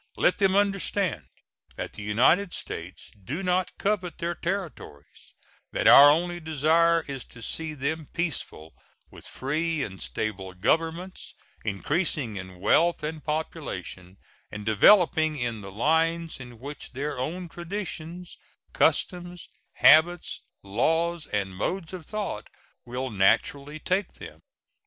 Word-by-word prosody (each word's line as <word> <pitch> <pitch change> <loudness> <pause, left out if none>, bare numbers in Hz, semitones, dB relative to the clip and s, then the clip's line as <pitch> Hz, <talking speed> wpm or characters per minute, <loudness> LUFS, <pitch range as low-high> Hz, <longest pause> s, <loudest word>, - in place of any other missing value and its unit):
Let - - +2
them 195 -1 +3
understand 200 -3 0 0.5
that - - -6
the - - -9
United 130 - +3
States 85 +3 -6
do 150 - -4
not 180 0 +1
covet 195 -4 -1
their 170 +1 -2
territories; 170 - -6 0.4
that - - -1
our 145 +1 +10
only 175 +3 +1
desire 160 +2 +3
is 135 -3 -5
to 115 - -12
see 160 +4 -3
them 150 +2 -3
peaceful, 150 - -4 0.4
with - - -13
free 155 +3 -1
and 95 -5 -7
stable 95 - -4
governments, 165 - -1 0.3
increasing 125 - -1
in 95 -1 -8
wealth 170 - +3
and 155 0 -4
population, 120 - -5 0.3
and 105 -1 -7
developing 155 - +5
in 120 -4 -3
the 100 -1 -8
lines 160 +8 +1
in 120 -2 -10
which 140 +4 -9
their 140 +1 -3
own 175 +7 -3
traditions, 175 -1 -6 0.3
customs, 175 -1 0 0.2
habits, 165 +3 +5 0.2
laws, 160 +11 0
and 95 -2 -2
modes 170 - -3
of 175 -5 -8
thought 210 - -4 0.4
will 125 +1 -4
naturally 140 +9 +1
take 185 +5 -1
them. - - -11
155 Hz, 125 wpm, -26 LUFS, 115-175 Hz, 0.5 s, our